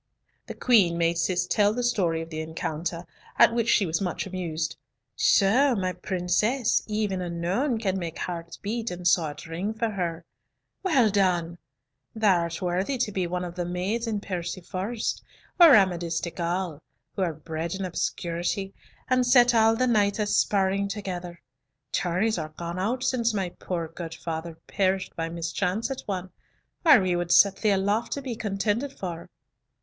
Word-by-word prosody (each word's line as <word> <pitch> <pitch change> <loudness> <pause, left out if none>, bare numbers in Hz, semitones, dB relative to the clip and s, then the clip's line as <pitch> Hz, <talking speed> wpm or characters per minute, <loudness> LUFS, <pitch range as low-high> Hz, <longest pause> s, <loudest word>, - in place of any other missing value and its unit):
The - - -7
Queen 195 -9 +4
made 170 0 +1
Cis 180 +1 +1
tell 205 +3 +2
the 245 - -1
story 175 -9 +1
of 165 - -12
the 155 0 -3
encounter, 160 +2 -4 0.3
at - - +6
which 235 -1 0
she 205 - +4
was 160 0 -1
much 180 -3 -2
amused. 170 -4 -3 0.4
"So 270 - +4
my 185 -3 -1
princess, 190 +7 +1
even 210 -3 -1
unknown, 180 - -1
can 195 -4 -1
make 170 -2 -5
hearts 170 -1 -5
beat 225 +2 -3
and 180 0 -3
swords 160 -3 +1
ring 180 +7 -3
for 225 0 -1
her. 170 -4 -3 0.6
Well 270 - +3
done! 175 -4 +1 0.6
thou 205 -5 +4
art 170 0 -3
worthy 185 +9 0
to 230 -3 -1
be 185 -3 -1
one 180 +1 -3
of 175 - -6
the 175 0 -3
maids 185 +7 -2
in 210 -3 -2
Perceforest 185 +4 -3 0.4
or 330 -6 +10
Amadis 175 -4 +2
de 170 - -4
Gaul, 170 -2 -3 0.3
who - - -2
are 175 -3 +1
bred 160 +2 -4
in 195 0 -3
obscurity, 175 +2 -2 0.3
and 255 0 +3
set 245 -1 +5
all 225 0 +5
the 255 - +1
knights 210 -4 +2
a 210 - 0
sparring 200 -1 +1
together. 180 -4 -5 0.5
Tourneys 185 +4 0
are 155 -1 -6
gone 170 +1 -4
out 240 +7 -1
since 235 -3 +1
my 190 -3 -1
poor 175 -1 -4
gude 165 0 -7
father 165 0 -5
perished 190 -1 -1
by 165 0 -3
mischance 180 +7 -2
at 265 - -4
one, 185 -2 -4 0.5
or 310 -7 +8
we 185 -2 +1
would 175 0 -2
set 200 +1 +6
thee 215 - +1
aloft 200 +3 +1
to 280 - -5
be 250 -3 -4
contended 215 +6 -1
for." 170 -3 -6
185 Hz, 170 wpm, -26 LUFS, 170-220 Hz, 0.6 s, or